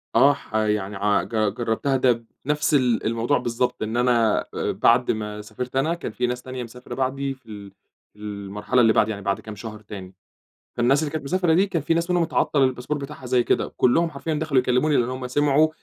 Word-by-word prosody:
آه، 145 Hz, +1 st, +6 dB
ح 110 Hz, -, -10 dB
يعني 105 Hz, -2 st, 0 dB
ع 100 Hz, +1 st, +1 dB
ج -, -, -10 dB, 0.2 s
جربتها 120 Hz, +4 st, 0 dB
ده 120 Hz, -3 st, +2 dB, 0.2 s
بنفس 150 Hz, +2 st, 0 dB
الأ 125 Hz, -5 st, +2 dB
الموضوع 115 Hz, +5 st, +1 dB
بالضبط، 120 Hz, -1 st, -1 dB
إن 110 Hz, +2 st, -2 dB
أأ -, -, +3 dB
أنا 120 Hz, -3 st, +2 dB, 0.3 s
بعد 120 Hz, +1 st, +3 dB
ما 105 Hz, -1 st, -4 dB
سافرت 125 Hz, +4 st, -7 dB
أنا، 145 Hz, +5 st, +2 dB
كان 170 Hz, -8 st, -5 dB
في 125 Hz, +3 st, -1 dB
ناس 125 Hz, 0 st, -3 dB
تانية 130 Hz, 0 st, -6 dB
مسافرة 125 Hz, +2 st, -9 dB
بعدي 135 Hz, +1 st, -1 dB
في 130 Hz, -, -22 dB
ال 100 Hz, -2 st, -9 dB, 0.4 s
في 105 Hz, -, -23 dB
المرحلة 105 Hz, +3 st, -1 dB
اللي 115 Hz, -2 st, +5 dB
بعدي، 110 Hz, -, +3 dB
يعني 100 Hz, -1 st, -6 dB
بعد 100 Hz, 0 st, 0 dB
كام 110 Hz, -1 st, -8 dB
شهر 110 Hz, +1 st, -8 dB
تاني، 95 Hz, -3 st, -9 dB, 0.6 s
فالناس 130 Hz, +4 st, +3 dB
اللي 150 Hz, -, -2 dB
كانت 155 Hz, -2 st, -4 dB
مسافرة 175 Hz, +2 st, +2 dB
دي 190 Hz, +4 st, +4 dB
كان 170 Hz, -6 st, -2 dB
في 160 Hz, +3 st, +1 dB
ناس 170 Hz, +2 st, -1 dB
منهم 175 Hz, -1 st, +3 dB
اتعطل 155 Hz, -3 st, +1 dB
الباسبور 130 Hz, +3 st, 0 dB
بتاعها 140 Hz, -2 st, -8 dB
زيي 125 Hz, 0 st, +3 dB
كده، -, -, 0 dB
كلّهم 165 Hz, +7 st, +3 dB
حرفيًا 155 Hz, +2 st, -4 dB
دخلوا 150 Hz, -3 st, +2 dB
يكلموني، 125 Hz, +4 st, +2 dB
لأن 120 Hz, -, +2 dB
هُم 130 Hz, 0 st, -4 dB
سمعوا 145 Hz, +4 st, +3 dB
125 Hz, 210 wpm, -23 LUFS, 110-145 Hz, 0.6 s, آه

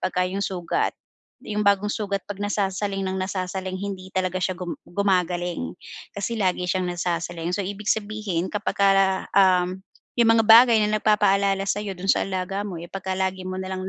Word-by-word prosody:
'pagka 185 Hz, 0 st, 0 dB
'yong 195 Hz, +2 st, -3 dB
sugat, 175 Hz, -3 st, -1 dB, 0.4 s
'yong 210 Hz, 0 st, -3 dB
bagong 200 Hz, 0 st, +3 dB
sugat, 200 Hz, -2 st, -2 dB
'pag 205 Hz, -, -5 dB
nasasaling 200 Hz, -1 st, -1 dB
nang 190 Hz, 0 st, -2 dB
nasasaling 185 Hz, 0 st, -3 dB
hindi 190 Hz, -2 st, -6 dB
talaga 185 Hz, -1 st, -1 dB
siya 185 Hz, 0 st, 0 dB
gum 180 Hz, -1 st, -5 dB
gumagaling. 175 Hz, -, -1 dB, 0.4 s
Kasi 205 Hz, +3 st, -3 dB
lagi 180 Hz, -3 st, 0 dB
siyang 185 Hz, 0 st, 0 dB
nasasaling. 175 Hz, 0 st, -2 dB
So 200 Hz, -, -2 dB
ibig 205 Hz, +2 st, -5 dB
sabihin 205 Hz, -5 st, -1 dB
kapagka, 195 Hz, -2 st, +2 dB
um, 185 Hz, -1 st, +3 dB, 0.4 s
'yong 235 Hz, -, +5 dB
mga 225 Hz, -, +4 dB
bagay 230 Hz, +2 st, +8 dB
na 210 Hz, 0 st, 0 dB
nagpapaalala 200 Hz, -2 st, +3 dB
sa 200 Hz, +1 st, -1 dB
'yo 200 Hz, -3 st, -5 dB
doon 185 Hz, +2 st, -6 dB
sa -, -, 0 dB
alaga 190 Hz, +1 st, -2 dB
mo, 200 Hz, -3 st, -5 dB
eh, 170 Hz, +1 st, -8 dB
pagka 190 Hz, -1 st, -3 dB
lagi 190 Hz, -1 st, -2 dB
mo 185 Hz, -, -4 dB
na 190 Hz, 0 st, -5 dB
lang 185 Hz, 0 st, -4 dB
190 Hz, 175 wpm, -24 LUFS, 185-200 Hz, 0.4 s, bagay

